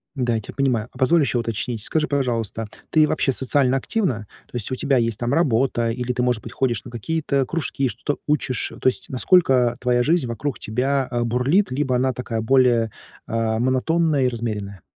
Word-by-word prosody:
Да, 120 -3 0
я 110 - -1
тебя - - -9
понимаю. 125 -5 0
А - - -15
позволь 160 +5 +4
ещё 130 -3 +1
уточнить. 115 0 -3
Скажи, 155 -1 +1
пожалуйста, 115 -6 -1 0.2
ты 155 -1 +5
вообще 135 - +1
социально 130 0 +1
активна? 130 - -1 0.2
То - - -14
есть 115 +3 -4
у - - 0
тебя 135 0 +1
есть 115 -3 0
там 120 +3 -1
работа 125 -6 +2
или 125 +1 -2
ты, 125 - -1
может 125 -3 0
быть, - - -8
ходишь 120 -5 0
на 120 - -9
какие-то 140 +2 -1
кружки, 140 -4 -1
что-то 140 +6 -3
учишь? 140 -4 -1
То - - 0
есть - - -6
насколько 130 -4 +3
твоя 120 -1 +2
жизнь 160 -3 +2
вокруг 130 +4 -3
тебя, 130 +4 0
а, 120 -1 -1
бурлит, 130 - +1
либо 130 -1 0
она 130 +1 +1
такая 115 -2 -3
более, 120 -2 +3 0.4
а, 115 -1 0
монотонная 140 +3 +2
и - - +4
размеренная? 105 -5 -4
125 Hz, 190 wpm, -22 LUFS, 115-140 Hz, 0.4 s, ты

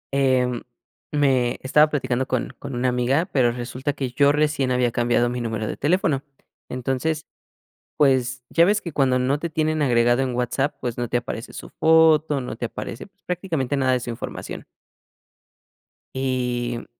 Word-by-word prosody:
Em, 130 -3 +2 0.5
me 130 -4 +2
Estaba 150 +3 +4
platicando 130 -3 -1
con 130 -2 -2
con 140 -2 -6
una 125 +1 +1
amiga, 125 +6 +1
pero 125 -4 +3
resulta 125 +4 -4
que 130 -2 -4
yo 140 +3 +4
recién 150 -3 +1
había 125 -1 +2
cambiado 120 0 +2
mi 125 0 -3
número 110 -2 -2
de - - -3
teléfono. 150 -3 +1 0.5
Entonces, 135 +5 -2 0.7
pues, 130 -2 +2
ya 170 +1 +5
ves 210 +2 +2
que 170 - -6
cuando 130 -3 +2
no 130 +3 +1
te 170 +3 -3
tienen 155 0 0
agregado 120 -2 +3
en 130 -2 -2
WhatsApp, 125 +4 -1
pues 120 -1 -3
no 120 - -2
te 120 - 0
aparece 120 -1 -5
su - - -9
foto, 160 -3 +4
no 125 -2 -6
te 120 - -3
aparece 115 - -7 0.2
prácticamente 165 -7 -2
nada 130 -1 +2
de 125 - +1
su 120 - -5
información. 115 - -7 1.5
Y, 125 -2 -1
mm - - -8
130 Hz, 165 wpm, -23 LUFS, 120-145 Hz, 1.5 s, ya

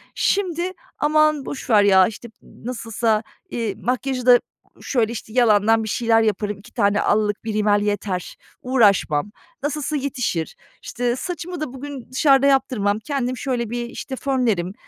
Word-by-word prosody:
şimdi, 365 -2 0 0.3
"Aman, 305 -1 +2
boş 280 0 -7
ver 210 -3 +6
ya." 190 -2 +6
işte, 225 +2 -8
"M - - -18
nasılsa, 225 -2 -1 0.3
iii, 225 -8 -3
makyajı 255 +2 -2
da 245 -1 +7 0.4
şöyle, 235 -4 0
işte, 220 -1 -7
yalandan 225 -2 +4
bir 220 - -4
şeyler 225 0 +2
yaparım, 210 -1 -1
2 230 +4 -17
tane 200 0 +2
allık, 210 0 +1
1 220 -1 -3
rimel 210 -1 +2
yeter, 205 -3 -2 0.3
uğraşmam, 205 - +2 0.3
nasılsa 300 +1 -2
yetişir." 250 - -2 0.3
İşte, 240 0 -2
"Saçımı 350 +3 -5
da 290 -5 -4
bugün 265 -2 -8
dışarıda 275 0 +4
yaptırmam, 250 -7 +1
kendim 255 +1 -2
şöyle 240 -3 -2
bir", 240 +1 -3
işte, 265 - -6
"fönlerim", 235 -10 0
240 Hz, 150 wpm, -21 LUFS, 210-270 Hz, 0.4 s, da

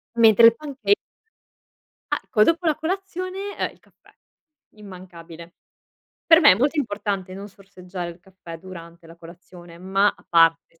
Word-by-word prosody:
Mentre 230 -1 +6
il 230 0 +6
panchei 295 +6 -1 1.2
Ecco 215 -2 +1
dopo 335 +4 0
la 310 - +2
colazione, 375 +3 -5
ehm, - - -3
il - - -24
caffè, - - -27 0.6
immancabile. 175 -4 -13 0.7
Per 330 0 +6
me 290 - +7
è - - +3
molto 280 - -1
importante 205 -6 -4
non 200 +1 -9
sorseggiare 185 -3 -9
il 170 +1 -15
caffè 180 -3 -13
durante 170 -2 -13
la 165 - -15
colazione, 170 0 -15
ma 195 +2 +1
a - - -24
parte, 165 0 +2
195 Hz, 145 wpm, -22 LUFS, 170-275 Hz, 1.2 s, me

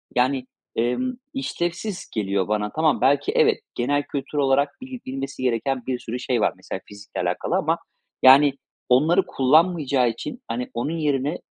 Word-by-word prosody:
yani, 130 +1 +2 0.3
emm, 125 - 0 0.2
işlevsiz 180 -5 -3
geliyor 100 -3 0
bana. 105 0 -1
Tamam 155 -3 +1
belki 135 +2 +3
evet, - - +3 0.2
genel 145 +4 +1
kültür 140 +1 -5
olarak 140 +1 +2
bil 260 -1 -7
bilmesi 135 0 -5
gereken 125 +1 0
bir 125 -2 -1
sürü 120 +2 -5
şey 125 -2 0
var - - +2
mesela 95 +1 -7
fizikle 100 0 -7
alakalı - - -1
ama, - - +1 0.5
yani, 135 +2 +8 0.4
onları 155 +9 +4
kullanmayacağı 140 -3 +3
için, 180 - -6
hani, 250 +4 -3
onun 165 +3 -2
yerine, 145 0 0
135 Hz, 150 wpm, -23 LUFS, 125-155 Hz, 0.5 s, yani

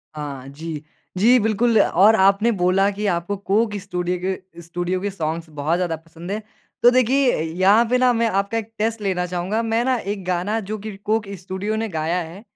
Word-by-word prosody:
हाँ, 140 -3 -6
जी। 155 +1 -7 0.3
जी 240 +6 +6
बिल्कुल, 220 +2 +2
और 205 +5 +5
आपने 200 +4 +4
बोला 195 0 +2
कि 205 +1 -4
आपको 175 +2 -1
कोक 205 +2 0
स्टूडियो 180 0 -2
के 185 -2 -5
स्टूडियो 175 +2 -3
के 205 - -1
सॉन्ग्स 165 -2 -4
बहुत 150 +2 -1
ज़्यादा 175 -3 -1
पसंद 165 +3 -10
है। 210 - -1 0.4
तो 240 - +9
देखिए 255 +1 +3
अ, - - -1 0.2
यहाँ 205 +5 +5
पे 250 - +3
ना 250 0 +4
मैं 230 0 +1
आपका 200 +3 0
एक 225 0 -5
टेस्ट 220 0 -1
लेना 185 -3 0
चाहूँगा। 180 +5 -1
मैं 225 +1 +1
ना, 260 -1 +2
एक 200 -2 -4
गाना 185 +5 -1
जो 215 - -2
कि 210 -1 -7
कोक 215 +1 -1
स्टूडियो 190 +4 -3
ने 225 0 -1
गाया 165 +2 -1
है, 170 +5 -9
195 Hz, 200 wpm, -21 LUFS, 175-220 Hz, 0.4 s, तो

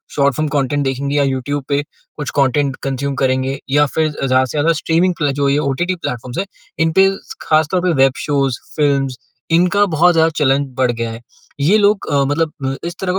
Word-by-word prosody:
Short 140 -1 +2
film 155 +1 -1
content 145 0 0
देखेंगी 140 +2 -1
या 140 - +3
YouTube 135 +1 -2
पे 140 0 +1 0.4
कुछ 145 -3 -4
कंटेंट 140 0 +2
कंज्यूम 135 +1 -2
करेंगे। 130 0 0
या 145 +1 +4
फिर 155 +2 0
ज़्यादा 130 -2 +1
से 130 - -8
ज़्यादा 155 +3 +3
स्ट्रीमिंग 175 +3 +2
प्ले 145 -3 0
जो 140 - +2 0.2
ओटीटी 175 +7 -1
प्लेटफ़ॉर्म्स 125 -6 -5
हैं, 195 - -1 0.3
इनपे 165 +4 +4 0.3
ख़ास 155 -1 +2
तौर 180 -1 +1
पे, 180 - +1
वेब 135 -1 +3
शोज़ 135 -4 0 0.2
फ़िल्म्स 140 -3 +1 0.3
इनका 180 +5 +3
बहुत 175 +3 +4
ज़्यादा 160 0 +4
चलन 135 +1 +2
बढ़ 125 -2 +3
गया 115 -1 -4
है। 115 - -9 0.4
ये 165 +10 +4
लोग 205 -1 +2
अ, 140 -1 +3
मतलब 155 +3 -1
अ, 135 0 -1
इस 175 - -6
तरह 185 -1 -1
145 Hz, 195 wpm, -17 LUFS, 135-160 Hz, 0.4 s, या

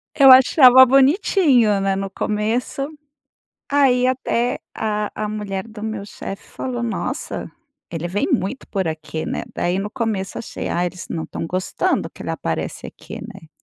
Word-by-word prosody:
Eu 270 -3 +8
achava 260 0 +8
bonitinho, 270 - +4
né, 195 0 +1
no 195 0 -3
começo. 220 +7 -2 0.8
Aí, 255 -3 +4
até 250 -1 0 0.2
a 210 -1 -2
a 215 0 -3
mulher 205 0 -4
do 215 -1 -10
meu 220 -2 -4
chefe 195 - -8
falou: 245 -2 -4
"Nossa, 230 - -4 0.4
ele 170 +1 -4
vem 205 +4 -1
muito 220 +8 -1
por 190 -5 -1
aqui, 155 0 -5
né?" - - -3
Daí 175 +2 0
no 205 +2 -3
começo 215 -5 -3
achei, - - -6
ah, 175 +1 0
eles 180 0 -7
não 160 -1 -3
estão 165 - -5
gostando 185 +2 -1
que - - -11
ele - - -4
aparece - - -4
aqui, - - -10
né. 195 -8 -11
215 Hz, 160 wpm, -21 LUFS, 195-255 Hz, 0.8 s, Eu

